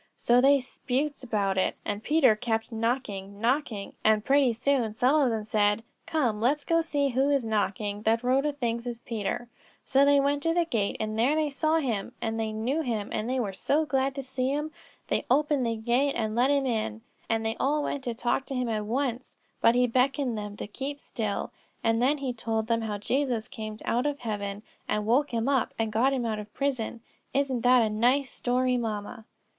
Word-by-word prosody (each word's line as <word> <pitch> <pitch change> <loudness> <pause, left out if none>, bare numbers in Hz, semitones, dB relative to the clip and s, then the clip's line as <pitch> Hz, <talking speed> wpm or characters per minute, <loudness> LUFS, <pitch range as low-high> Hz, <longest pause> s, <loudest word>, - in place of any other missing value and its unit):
So 245 +1 +4
they 280 +1 +6
'sputes 270 +3 -3
about 200 -5 0
it - - +1
and 205 0 -2
Peter 270 -3 +4
kept 225 0 -2
knocking, 220 -4 -2
knocking, 235 -3 -1
and 215 -1 +3
pretty 275 -2 +4
soon 240 -2 0
some 265 +6 +3
of 265 - +3
them 220 -2 -2
said: 210 0 +1 0.2
'Come, 245 -10 0
let's 285 +5 +2
go 330 0 +3
see 290 -3 0
who 265 +2 +2
is 280 -4 +2
knocking, 205 -1 -1
that 225 +2 +1
Rhoda 270 +4 +2
thinks 240 -4 -3
is 235 -1 -5
Peter;' 230 +1 -3 0.4
so 270 +1 +4
they 285 0 +5
went 285 +1 +1
to 330 +2 +1
the 345 -1 +3
gate 220 -10 -1
and 215 0 -2
there 260 +6 +3
they 310 -2 0
saw 310 +3 +1
him, 240 -7 -2
and 225 0 -2
they 220 -1 -1
knew 240 +8 -1
him 225 -7 -2
and 220 +2 -2
they 260 0 0
were 205 -5 -2
so 295 +11 +1
glad 270 -1 0
to 275 - -4
see 260 0 -2
him; 295 +3 -2 0.4
they - - 0
opened 285 -1 +2
the 230 - 0
gate 245 +5 +1
and 220 -2 -1
let 250 +3 +3
him 280 -1 +2
in, 215 - -2 0.3
and 225 0 0
they 225 0 0
all 295 +2 +1
wanted 285 - -2
to 240 -3 -4
talk 245 +3 -1
to 270 - -4
him 250 -2 -1
at 215 -2 -1
once, 250 +1 -2 0.2
but 230 - +5
he 250 0 +4
beckoned 255 +1 +1
to 210 - -3
them 205 0 -7
to - - -5
keep 275 +7 -5
still, 215 -6 -3 0.3
and 225 0 +2
then 280 +4 +3
he 270 -3 -3
told 225 -1 -2
them 230 0 +1
how 215 -2 -3
Jesus 245 +1 -1
came 215 -2 -6
down - - -13
out 250 - +1
of 290 -1 -3
heaven 205 -2 -4 0.2
and 210 0 -1
woke 260 +7 +3
him 230 +1 -1
up, 270 -3 +1
and 225 -1 -1
got 245 +5 +3
him 260 -3 -1
out 215 -2 -1
of 210 0 -9
prison. 255 -5 -2 0.3
Isn't 270 -3 +1
that 250 0 +5
a 220 - +1
nice 250 +5 +2
story, 250 0 +1
mamma?" 220 0 -4
245 Hz, 215 wpm, -27 LUFS, 220-275 Hz, 0.4 s, they